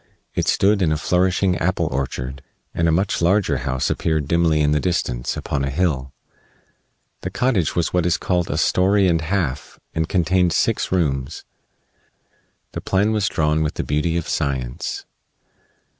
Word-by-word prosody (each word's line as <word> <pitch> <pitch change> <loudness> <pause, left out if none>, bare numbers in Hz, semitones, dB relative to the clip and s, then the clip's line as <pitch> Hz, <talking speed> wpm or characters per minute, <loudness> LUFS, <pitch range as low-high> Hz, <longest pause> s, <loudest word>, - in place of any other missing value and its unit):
It - - -1
stood 100 +1 +3
in 85 -4 +2
a 75 - +1
flourishing 90 +2 +1
apple 90 +2 0
orchard, 65 0 -3 0.3
and 85 - +1
a - - +3
much 95 +4 0
larger 85 -4 +2
house 65 -1 -1
appeared 80 -3 -1
dimly 80 -1 +2
in 75 0 +2
the 75 - +2
distance, 60 -9 -1
upon 70 - -2
a 70 - -1
hill. 70 -4 -1 1.1
The 95 - -3
cottage 100 - 0
was 85 - 0
what 90 -1 +2
is 85 - +2
called 90 -2 -1
a - - -1
"story 95 +1 +3
and 85 -2 +2
half" 80 -5 -2
and 80 0 -1
contained 90 -1 +2
six 115 - 0
rooms. 70 -6 -1 1.3
The - - -5
plan 100 +3 +1
was 105 -3 +1
drawn 75 0 +1
with 75 - -1
the - - -2
beauty 75 +3 0
of 85 - -3
science. 65 -5 -3
85 Hz, 160 wpm, -21 LUFS, 75-95 Hz, 1.3 s, stood